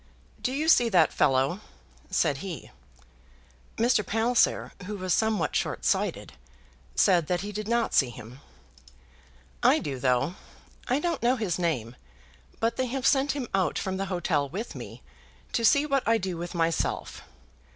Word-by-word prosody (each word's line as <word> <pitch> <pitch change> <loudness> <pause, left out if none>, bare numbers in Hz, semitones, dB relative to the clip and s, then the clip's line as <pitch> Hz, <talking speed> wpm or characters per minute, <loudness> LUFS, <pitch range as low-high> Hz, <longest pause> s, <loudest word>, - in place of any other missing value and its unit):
"Do 255 - -1
you 295 +4 -1
see 245 -7 +5
that 175 -7 +4
fellow?" 135 +8 +2 0.5
said 140 - +1
he. 180 0 -7 1.1
Mr. 230 -2 +3
Palliser, 225 +4 +1 0.2
who 210 0 -4
was 185 -1 -1
somewhat 220 -1 +1
short - - -2
sighted, - - 0 0.6
said 175 -6 +3
that 180 -1 0
he 205 +1 -5
did 210 0 -5
not 235 0 0
see 135 - +4
him. 120 +2 -11 1.2
"I - - +5
do, 135 -3 -4
though. 130 +5 +1 0.5
I 255 - +2
don't 335 0 -1
know 245 +2 +3
his 205 -8 -2
name, 130 -9 -1 0.6
but 230 +1 0
they 260 - 0
have 265 +2 -3
sent 275 0 +3
him 275 -4 -4
out 185 -6 +1
from 190 0 -2
the 195 - -2
hotel 160 -6 0
with 210 - -5
me, - - -9 0.5
to 230 - -1
see 285 +6 +5
what 275 -2 +1
I 230 0 +4
do 185 -4 -3
with 175 +1 -6
myself. 165 0 -1
195 Hz, 160 wpm, -27 LUFS, 165-235 Hz, 1.2 s, see